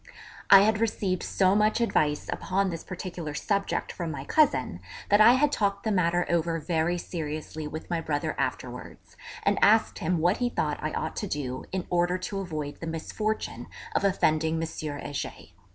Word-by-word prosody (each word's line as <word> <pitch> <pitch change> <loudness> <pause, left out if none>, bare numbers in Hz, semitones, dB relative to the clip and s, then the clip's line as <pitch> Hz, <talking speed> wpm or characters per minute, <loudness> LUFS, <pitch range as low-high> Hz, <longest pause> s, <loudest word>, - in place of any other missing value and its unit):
I 195 -1 +10
had 215 +1 +3
received 200 -5 0
so 190 -1 +2
much 215 +2 +3
advice 150 -10 +1
upon 190 0 0
this 165 - -6
particular 175 -5 -6
subject 200 +4 -1
from 170 -2 -4
my 140 -3 -5
cousin 130 - +2 0.3
that 205 +1 +5
I 235 +3 +9
had 285 +3 +3
talked 200 -5 0
the 220 - 0
matter 175 -2 +2
over 170 -1 0
very 165 +2 0
seriously 155 -2 -5
with 155 +1 -7
my 170 -1 -1
brother 145 -2 -1
afterwards, - - -5 0.3
and - - +2
asked - - +4
him 175 +2 0
what 175 +4 +2
he 245 -1 0
thought - - -1
I - - -2
ought - - -3
to 210 - -2
do 130 -6 -4
in 190 -1 -2
order 175 +1 +2
to 195 +2 -4
avoid 155 -6 -5
the 165 - -6
misfortune 210 +7 -3 0.3
of - - +2
offending 160 -5 +2
M. 165 0 -1
Heger. 145 - -5
175 Hz, 175 wpm, -27 LUFS, 155-200 Hz, 0.3 s, I